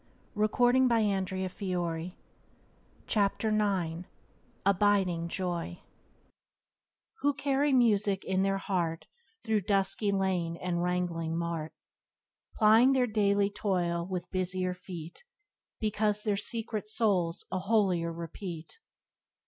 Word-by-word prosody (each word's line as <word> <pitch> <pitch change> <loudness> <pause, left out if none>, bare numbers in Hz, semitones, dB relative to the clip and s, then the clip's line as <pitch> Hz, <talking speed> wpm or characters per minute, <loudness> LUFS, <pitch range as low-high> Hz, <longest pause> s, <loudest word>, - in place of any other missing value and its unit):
Byways 210 +1 +2
to - - -11 0.3
Blessedness - - +1
by 185 -5 -1 0.9
James 205 +1 +1
Allen 215 -1 +2
48 180 -5 -1 0.6
Abiding 195 -4 +2
Joy 175 -1 -3 1.4
"Who 285 -1 +1
carry 280 +1 +1
music 210 -6 +3
in 190 0 0
their 195 0 +1
heart 170 -4 -2 0.4
Through 220 -2 +1
dusky 200 +1 +2
lane 185 -4 0
and 175 -1 -2
wrangling 175 -2 -1
mart, 170 -2 -3 0.8
Plying 225 +4 +6
their 255 -2 +3
daily 200 -2 +1
toil 175 -4 -1
with 180 -1 -4
busier 185 0 -1
feet, 180 - -9 0.6
Because 210 -1 +2
their 210 -2 +1
secret 215 +1 -3
souls 190 -6 0
a 185 - -1
holier 190 -4 +1
repeat. 170 - -7
190 Hz, 110 wpm, -30 LUFS, 175-210 Hz, 1.4 s, Plying